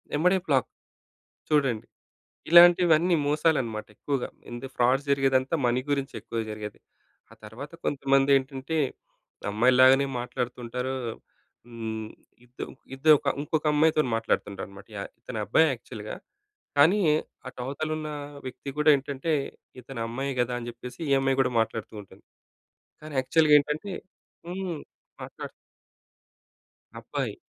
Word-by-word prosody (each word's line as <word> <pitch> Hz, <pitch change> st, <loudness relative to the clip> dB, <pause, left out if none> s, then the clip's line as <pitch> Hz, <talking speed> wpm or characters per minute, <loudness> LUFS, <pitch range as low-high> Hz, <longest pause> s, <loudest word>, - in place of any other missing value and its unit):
ఏమ్మటే 180 Hz, +5 st, +3 dB
black 135 Hz, -5 st, +2 dB, 0.8 s
చూడండి. 135 Hz, -7 st, +1 dB, 0.6 s
ఇలాంటివన్నీ 175 Hz, 0 st, +7 dB
మోసాలన్నమాట. 145 Hz, -8 st, +1 dB
ఎక్కువగా 140 Hz, +1 st, -2 dB, 0.2 s
ఇంద 120 Hz, +2 st, -7 dB
ఫ్రాడ్ 125 Hz, +2 st, +3 dB
జరిగేదంతా 135 Hz, +1 st, +2 dB
మనీ 120 Hz, +1 st, +2 dB
గురించి 140 Hz, -1 st, -1 dB
ఎక్కువ 115 Hz, +1 st, -5 dB
జరిగేది. 105 Hz, -1 st, -7 dB, 0.5 s
ఆ -, -, -12 dB
తరువాత 120 Hz, +8 st, -9 dB
కొంతమంది 135 Hz, 0 st, +2 dB
ఏంటంటే 135 Hz, +3 st, -4 dB, 0.7 s
అమ్మాయిలాగానే 130 Hz, +5 st, +5 dB
మాట్లాడుతుంటారు. 125 Hz, +1 st, -4 dB, 0.7 s
హ్మ్. 110 Hz, -2 st, -5 dB, 0.4 s
ఇద్ 125 Hz, +1 st, -8 dB, 0.3 s
ఇద్దరు 150 Hz, +3 st, +6 dB, 0.2 s
ఇంకొక 155 Hz, +1 st, -2 dB
అమ్మాయితో‌న్ని 155 Hz, -3 st, +3 dB
మాట్లాడుతుంటారన్నమాట 100 Hz, -3 st, -3 dB
యహ్! 100 Hz, -, -5 dB
ఇతనబ్బాయి 120 Hz, +7 st, +2 dB
యాక్చువల్‌గా 110 Hz, -3 st, -8 dB, 0.6 s
కానీ 165 Hz, +9 st, +6 dB, 0.5 s
అటు 130 Hz, -, -10 dB
అవతల 140 Hz, +4 st, -3 dB
ఉన్న 155 Hz, -1 st, -5 dB, 0.4 s
వ్యక్తి 130 Hz, +2 st, -7 dB
గూడా 150 Hz, +1 st, +4 dB
ఏంటంటే, 140 Hz, +3 st, -3 dB, 0.5 s
ఇతను 125 Hz, 0 st, -9 dB
అమ్మాయే 135 Hz, +4 st, -3 dB
కదా! 125 Hz, 0 st, +1 dB
అని 120 Hz, -1 st, -6 dB
జెప్పేసి 125 Hz, +3 st, -10 dB
ఈ -, -, +1 dB
అమ్మాయి 135 Hz, 0 st, +1 dB
కూడా 130 Hz, -1 st, +1 dB
మాట్లాడుతూ 110 Hz, -1 st, -2 dB
ఉంటుంది. 100 Hz, -, -18 dB, 0.8 s
కానీ 155 Hz, 0 st, -9 dB
యాక్చువల్‌గా 150 Hz, +3 st, +4 dB
ఏంటంటే? 150 Hz, +7 st, -3 dB, 0.5 s
హ్మ్. 180 Hz, -3 st, -4 dB, 0.4 s
మాట్లాడు -, -, -8 dB, 1.5 s
అబ్బాయి. -, -, -3 dB
135 Hz, 110 wpm, -27 LUFS, 120-150 Hz, 1.5 s, ఇలాంటివన్నీ